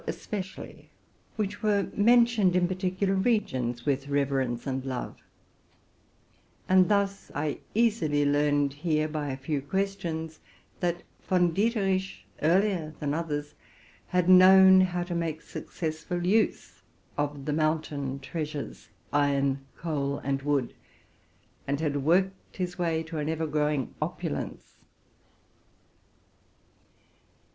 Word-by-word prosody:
especially, 190 -3 -6 0.5
which 205 -1 -3
were 205 -2 +2
mentioned 230 -3 +4
in 180 -1 +3
particular 185 +1 -1
regions 130 - 0
with 140 -1 0
reverence 135 -4 0
and 135 -1 -2
love; 130 -2 -4 1.5
and 185 0 +5
thus 200 -1 0
I 145 0 -2 0.2
easily 185 -11 +2
learned 145 -1 +2
here, 155 +1 0
by 150 -1 -3
a 130 - -3
few 140 +1 -2
questions, 165 -1 -3 0.4
that 175 -1 -1 0.2
Von 175 -2 +3
Dieterich, 195 -2 0 0.2
earlier 170 -1 +1
than 145 -2 -1
others, 150 -2 -3 0.5
had 180 -1 +1
known 190 +1 +8
how 180 -1 0
to 175 0 -5
make 165 -2 -2
successful 165 +2 -4
use 215 +5 0 0.3
of 145 -1 -3
the 150 - -1
mountain 155 -3 -1
treasures, 150 0 -5 0.2
iron, 140 -1 +1
coal, 140 -4 -2
and 135 0 -1
wood, 140 -3 0 0.9
and 140 0 -1
had 150 -3 0
worked 185 +7 0
his 180 -1 -3
way 165 -2 0
to 160 -1 -5
an 150 +1 -2
ever 160 0 -1
growing 150 -4 -1
opulence. - - -4
160 Hz, 115 wpm, -28 LUFS, 145-190 Hz, 1.5 s, known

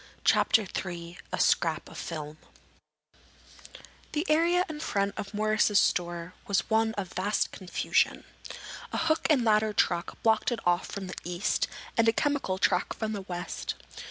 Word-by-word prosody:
CHAPTER 220 0 +4 0.2
III 175 -1 -7
A - - -2
SCRAP 165 -1 +2
OF - - -12
FILM 155 -2 -6 1.8
The 310 +3 0
area 340 +4 +3
in 310 -1 -6
front 200 -8 0
of 200 - -5
Morris's 215 0 +2
store 175 -2 +1
was 200 -3 +1
one 220 0 +2
of 190 -3 -4
vast 200 +3 0
confusion. 185 -2 0 0.7
A - - -2
hook 320 0 +1
and 270 -6 +4
ladder 215 -1 +3
truck 175 -3 0
blocked 225 +2 +3
it 240 - -1
off 175 0 +2
from 200 -1 -5
the 185 - -6
east 175 +2 0 0.3
and 230 0 +5
a - - +3
chemical 285 -9 0
truck - - +1
from 220 -1 -3
the 205 - -3
west. 180 -2 -4
205 Hz, 155 wpm, -29 LUFS, 175-225 Hz, 1.8 s, and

